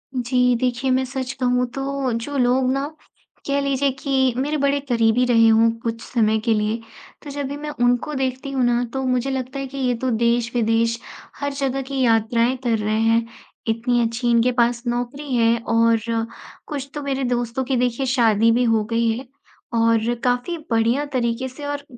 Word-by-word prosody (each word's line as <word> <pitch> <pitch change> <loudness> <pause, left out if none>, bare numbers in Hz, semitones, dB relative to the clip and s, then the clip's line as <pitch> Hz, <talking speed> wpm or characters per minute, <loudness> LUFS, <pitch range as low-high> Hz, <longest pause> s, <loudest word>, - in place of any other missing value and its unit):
जी 250 0 +2
देखिए 255 +1 0
मैं 260 +1 +2
सच 260 0 -4
कहूँ 250 0 +2
तो 275 -1 -2
जो 250 +5 -3
लोग 255 +1 +2
ना, 275 +2 -1 0.6
कह 280 0 +1
लीजिए 275 0 +1
कि 265 -3 +1
मेरे 295 +3 0
बड़े 280 0 +1
करीबी 230 +1 +3
रहे 230 -2 +5
हों 225 +1 +5
कुछ 230 0 -3
समय 220 -2 +1
के 225 - +3
लिए 215 +2 0 0.4
तो 290 - -8
जब 285 -1 -3
भी 285 +1 -5
मैं 300 0 -6
उनको 245 +5 +1
देखती 265 +1 -2
हूँ 260 -2 0
ना 240 0 +2
तो 265 0 -2
मुझे 255 +1 0
लगता 260 +1 -4
है 270 - -4
कि 275 +1 -9
ये 250 -2 +1
तो 260 - +1
देश-विदेश 230 0 +1 0.4
हर 285 0 -2
जगह 270 -1 -1
की 265 0 -3
यात्राएँ 230 +1 +2
कर 230 -2 +1
रहे 215 +1 -1
हैं। 230 0 +3 0.4
इतनी 240 +2 +1
अच्छी 230 +1 -1
इनके 235 +1 +3
पास 240 0 +1
नौकरी 245 +4 -3
है 230 0 +3
और 230 0 +4 0.7
कुछ 280 -3 -5
तो 295 - -4
मेरे 275 -1 -2
दोस्तों 245 +1 -1
की 260 0 -1
देखिए 250 +2 0
शादी 230 -3 +3
भी 245 +2 +2
हो 225 -2 +2
गई 230 0 +2
है 255 0 -9 0.5
और 230 0 +2
काफ़ी 250 +7 0
बढ़िया 230 +5 +2
तरीके 240 +1 -1
से 285 +3 -9
और 285 0 -3
245 Hz, 185 wpm, -22 LUFS, 230-270 Hz, 0.7 s, रहे